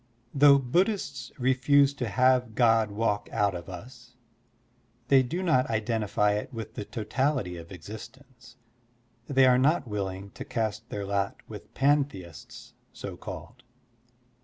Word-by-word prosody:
Though 140 0 +7
Buddhists 170 - -1
refuse 135 +2 +3
to 125 -5 -4
have 125 -1 +2
God 115 -3 +4
walk 105 0 -1
out 100 -1 +1
of 85 0 -7
us, 120 +7 -11 0.9
they 135 -1 +6
do 165 +9 -3
not 155 -8 +2
identify 110 -2 0
it 105 +5 -3
with 110 -3 -7
the 105 - -6
totality 125 -3 -1
of 85 +1 -10
exist 105 +8 -9
ence, 125 -2 -19 0.7
they 135 -2 +4
are 125 -1 +5
not 145 +1 +2
willing 100 -2 -4
to - - -8
cast 110 0 -3
their 100 -1 -4
lot 100 0 -1
with - - -11
pantheists 135 - -1 0.2
so - - -7
called. - - -9
120 Hz, 135 wpm, -27 LUFS, 105-135 Hz, 0.9 s, Though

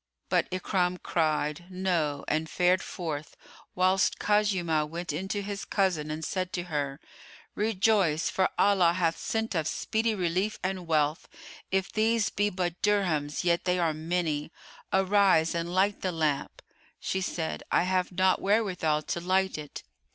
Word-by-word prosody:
But - - +2
Ikrimah 180 -1 -1
cried, 155 0 0
"No," 175 -6 -1
and 155 +1 -1
fared 180 +2 +2
forth, 155 -5 -5 0.4
whilst 185 +1 +2
Khuzaymah 180 -7 +1
went 170 -1 -4
in 180 +6 -3
to 205 0 -2
his 200 0 -5
cousin 180 -7 0
and 155 +1 -4
said 185 -1 -2
to 175 - -2
her, 145 -4 -3 0.5
"Rejoice 200 -6 +2
for 190 - +1
Allah 185 -4 +4
hath 170 -2 +1
sent 225 -3 -2
us 160 -2 0
speedy 220 0 0
relief 185 +3 -1
and 185 -2 -3
wealth; 155 -1 +1 0.4
if 190 0 0
these 220 0 +1
be 205 +1 +1
but 180 -3 -3
dirhams, 175 -8 +1
yet 170 -1 +2
are 175 -3 +2
they 155 - -9
many. 160 -2 -1 0.4
Arise 190 -4 +3
and 170 0 -2
light 195 +3 +1
the 185 - -1
lamp." 155 -4 -2 0.4
She 190 - -2
said, 165 -3 -3
"I - - +4
have 185 0 0
not 185 +1 +2
wherewithal 185 -7 +1
to 170 - -3
light 190 +2 +1
it." 150 -1 -8
180 Hz, 150 wpm, -28 LUFS, 160-195 Hz, 0.5 s, Allah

